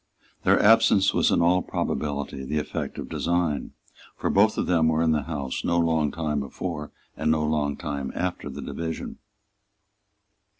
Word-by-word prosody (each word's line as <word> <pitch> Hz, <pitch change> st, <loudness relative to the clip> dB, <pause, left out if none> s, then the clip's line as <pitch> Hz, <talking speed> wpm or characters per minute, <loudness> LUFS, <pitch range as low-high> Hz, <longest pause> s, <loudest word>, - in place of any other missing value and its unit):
Their -, -, +4 dB
absence 110 Hz, -3 st, +5 dB
was -, -, +3 dB
in -, -, +3 dB
all 90 Hz, +2 st, +4 dB
probability 70 Hz, -4 st, -3 dB
the 75 Hz, +3 st, -2 dB
effect 75 Hz, -, -4 dB
of -, -, -5 dB
design; 85 Hz, -4 st, -1 dB, 0.4 s
for -, -, -1 dB
both 105 Hz, +2 st, +4 dB
of -, -, 0 dB
them 80 Hz, -3 st, +3 dB
were 80 Hz, +1 st, +2 dB
in 80 Hz, -, +3 dB
the 75 Hz, -1 st, +2 dB
House 70 Hz, -4 st, -4 dB
no 85 Hz, -, +1 dB
long 80 Hz, -3 st, +2 dB
time 75 Hz, -2 st, -2 dB
before 75 Hz, +2 st, -5 dB, 0.2 s
and 80 Hz, -, -1 dB
no 80 Hz, -1 st, +2 dB
long 75 Hz, -2 st, 0 dB
time 70 Hz, -4 st, -4 dB
after 90 Hz, 0 st, -3 dB
the -, -, -7 dB
division. 80 Hz, -1 st, -5 dB
80 Hz, 165 wpm, -25 LUFS, 75-85 Hz, 0.4 s, absence